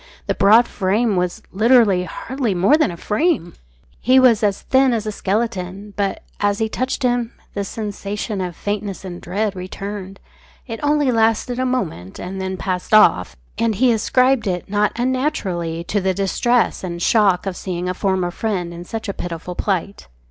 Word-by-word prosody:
The - - 0
broad 220 +4 +5
frame 205 +3 0
was 180 -1 -1
literally 215 -3 +4
hardly 250 -1 -3
more 190 +12 +4
than 310 -7 +2
a 170 - -7
frame. 215 - 0 0.5
He 260 +2 +5
was 245 -4 +5
as 205 -2 0
thin 265 -1 +3
as 220 -2 -1
a 215 - -2
skeleton. 200 -1 -3
But, 200 -1 -2 0.2
as 205 0 +1
he 220 - 0
touched 255 +4 -2
him, 245 -2 0 0.2
the 200 - -2
sensation 205 0 -4
of 180 -2 -4
faintness 205 -1 -4
and 175 -1 -7
dread 200 +3 -2
returned. 195 +1 -6 0.5
It 230 -3 -6
only 295 -2 +2
lasted 225 +2 +1
a 255 - +1
moment, 165 - -3
and 190 +1 -5
then 190 0 -3
passed 185 +3 -1
off, 90 - +5 0.2
and 230 -2 +1
he 250 +4 +4
ascribed 250 +1 +2
it 180 -2 -2
not 205 +1 +1
unnaturally 195 - -1
to 205 +4 -1
the 190 0 0
distress 230 +6 +1
and 170 -2 -4
shock 200 -1 +3
of 190 -2 -3
seeing 180 -1 -4
a 180 - -1
former 185 -1 0
friend 185 -4 -3
in 170 +1 -8
such 225 +3 -5
a 200 - -2
pitiful 175 0 -6
plight. 195 +1 -2
205 Hz, 175 wpm, -20 LUFS, 185-235 Hz, 0.5 s, broad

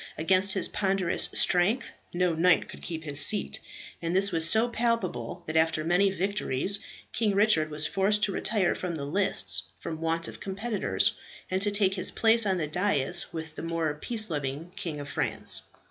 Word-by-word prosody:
Against 190 +4 +2
his 190 - 0
ponderous 195 -3 -1
strength 190 +8 +1 0.2
no 180 -1 0
knight 175 +2 +2
could - - -12
keep 160 -2 -6
his 145 -2 -2
seat; 210 +6 +3 0.4
and 170 +1 -3
this 195 +1 +2
was 165 -1 +2
so 220 +4 +4
palpable, 230 - -2
that 155 - -6
after 160 -1 +1
many 180 +4 +2
victories, 195 -2 +2 0.3
King 210 -4 0
Richard 195 -7 +3
was 150 0 -1
forced 205 +2 0
to 200 - +1
retire 195 -2 0
from 180 -2 -5
the 140 -3 -5
lists 100 - +2 0.2
from 160 -1 -7
want 165 0 -1
of - - -10
competitors, 205 +3 -1 0.4
and 185 +1 -1
to 205 - +2
take 200 -2 0
his 185 - +2
place 225 -1 +3
on 190 -1 0
the 160 - -2
dais 175 -1 +2
with 160 -1 -7
the - - -8
more 165 -2 -2
peace 215 +6 +2
loving 145 +3 -5
King 155 -4 -5
of 145 - -8
France. - - +1
180 Hz, 180 wpm, -27 LUFS, 160-200 Hz, 0.4 s, so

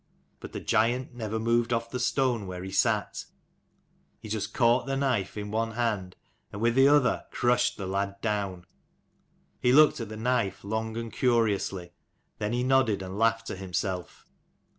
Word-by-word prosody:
But - - -9
the - - -5
giant 120 +4 +1
never 110 -2 -4
moved 115 +1 +1
off 115 0 -1
the 125 - -3
stone 125 -4 0
where 90 0 -6
he 95 - -6
sat: - - 0 0.9
he 110 - -10
just 105 -1 -3
caught 120 +3 +2
the 135 0 -1
knife 120 -9 -1
in 105 0 -5
one 115 +1 -1
hand, 105 -6 -2 0.4
and 100 - -7
with 115 +1 +2
the 135 +2 +6
other 145 -3 +3
crushed 120 0 +1
the 100 - -5
lad 100 +1 -2
down. 100 -5 -2 1.0
He 125 - +3
looked 150 +1 +6
at 115 - -5
the 110 - -7
knife 115 -4 -1
long 110 +2 -3
and 115 -1 -5
curiously, 105 -7 0 0.5
then 105 0 -1
he 120 +1 0
nodded 130 -6 +2
and 95 +2 -6
laughed 115 0 +2
to - - -5
himself. 95 -1 -4
110 Hz, 170 wpm, -28 LUFS, 100-120 Hz, 1.0 s, the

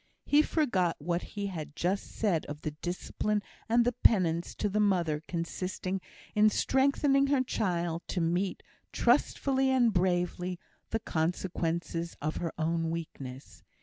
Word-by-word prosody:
He 290 +1 +5
forgot 220 - +1
what 170 +3 -1
he 205 -1 -5
had 160 -6 -5
just 185 +4 -1
said, 190 -8 +1
of 150 +1 -6
the 155 - -2
discipline 180 +6 -2 0.3
and 235 +1 +4
penance 170 -6 +3
to 210 - 0
the 205 +1 0
mother 175 -7 +2
consisting 185 +2 -3 0.3
in 210 0 +5
strengthening 275 +3 +3
her 275 -2 +3
child 170 -8 -1
to 185 - -2
meet, 175 +3 0 0.3
trustfully 270 -1 +2
and 245 -4 +4
bravely, 180 0 0 0.3
the 225 - 0
consequences 170 0 -2
of 155 +2 -2
her 165 -2 -2
own 165 0 0
weakness. 135 - -7
180 Hz, 135 wpm, -30 LUFS, 165-210 Hz, 0.3 s, He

